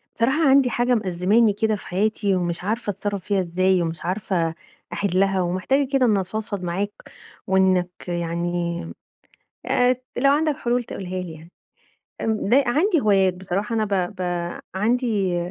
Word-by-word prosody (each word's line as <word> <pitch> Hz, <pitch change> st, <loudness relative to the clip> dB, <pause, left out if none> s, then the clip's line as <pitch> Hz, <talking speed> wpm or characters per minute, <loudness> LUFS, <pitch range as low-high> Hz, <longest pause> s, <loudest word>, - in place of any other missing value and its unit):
بصراحة 270 Hz, +6 st, +2 dB
عندي 265 Hz, -1 st, +5 dB
حاجة 245 Hz, +1 st, +1 dB
مأزماني 205 Hz, +2 st, +2 dB
كده 220 Hz, +1 st, 0 dB
في 205 Hz, -, -10 dB
حياتي، 200 Hz, +1 st, 0 dB
ومش 175 Hz, -1 st, -2 dB
عارفة 220 Hz, +3 st, -2 dB
أتصرَّف 200 Hz, -1 st, -4 dB
فيها 200 Hz, -2 st, +1 dB
إزاي، 185 Hz, +1 st, +1 dB
ومش 165 Hz, 0 st, -4 dB
عارفة 180 Hz, -3 st, -1 dB, 0.4 s
أحلَّها، 195 Hz, 0 st, +1 dB
ومحتاجة 185 Hz, +11 st, 0 dB
كده 265 Hz, -2 st, +4 dB
إن 215 Hz, -4 st, +3 dB
أفضفض 200 Hz, +1 st, -4 dB
معاك، 190 Hz, +4 st, -2 dB, 0.6 s
وإنّك 185 Hz, -1 st, +3 dB, 0.2 s
يعني 170 Hz, 0 st, -2 dB, 0.8 s
آآ، 250 Hz, 0 st, +3 dB, 0.2 s
لو 275 Hz, +2 st, +4 dB
عندك 305 Hz, +1 st, +2 dB
حلول 245 Hz, 0 st, 0 dB
تقولها 185 Hz, -4 st, -5 dB
لي 175 Hz, -3 st, -7 dB
يعني، 160 Hz, +2 st, -14 dB, 0.7 s
امم 220 Hz, -2 st, -1 dB
د -, -, +3 dB
عندي 295 Hz, -, +3 dB
هوايات، 195 Hz, -4 st, +3 dB
بصراحة 190 Hz, +5 st, -3 dB
أنا 220 Hz, -1 st, +1 dB
ب 195 Hz, -1 st, -1 dB
ب 185 Hz, -, -7 dB, 0.5 s
عندي 210 Hz, -4 st, +1 dB
200 Hz, 145 wpm, -23 LUFS, 180-230 Hz, 0.8 s, عندي